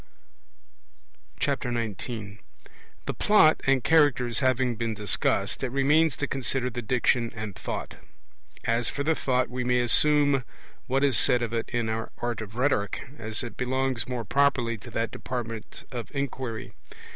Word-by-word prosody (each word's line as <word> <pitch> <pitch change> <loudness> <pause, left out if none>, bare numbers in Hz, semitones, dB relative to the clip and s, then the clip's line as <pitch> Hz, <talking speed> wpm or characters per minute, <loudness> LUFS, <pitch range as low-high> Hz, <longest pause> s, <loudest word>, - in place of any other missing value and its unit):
19 110 -3 -4 0.7
The - - -2
Plot 205 -7 +4
and 135 -2 +3
Characters 145 -7 +3
having 130 -2 +1
been 115 -1 -2
discussed, 105 -1 +1
it 130 - 0
remains 145 +4 +3
to 145 - -1
consider 130 -1 0
the 120 - -4
Diction 120 0 +1
and 110 -3 -5
Thought. - - -5 0.7
As 115 +1 +1
for 140 +1 -3
the 160 +2 +2
Thought, 130 -4 0
we 125 0 -2
may 125 0 +2
assume 145 +2 +4 0.4
what 135 +2 +1
is 135 -5 +4
said 125 -1 +3
of 115 -1 -3
it 115 -1 -2
in 120 -2 -1
our 110 +1 -3
Art 120 -2 -3
of 110 0 -8
Rhetoric, 120 -5 0
as 110 +1 -2
it 120 - -7
belongs 130 -1 -1
more 120 -3 -3
properly 140 -4 +2
to 120 - -11
that 115 0 -2
department 115 -3 -6
of 120 -3 -5
inquiry. 130 -5 -4
125 Hz, 150 wpm, -27 LUFS, 115-135 Hz, 0.7 s, Plot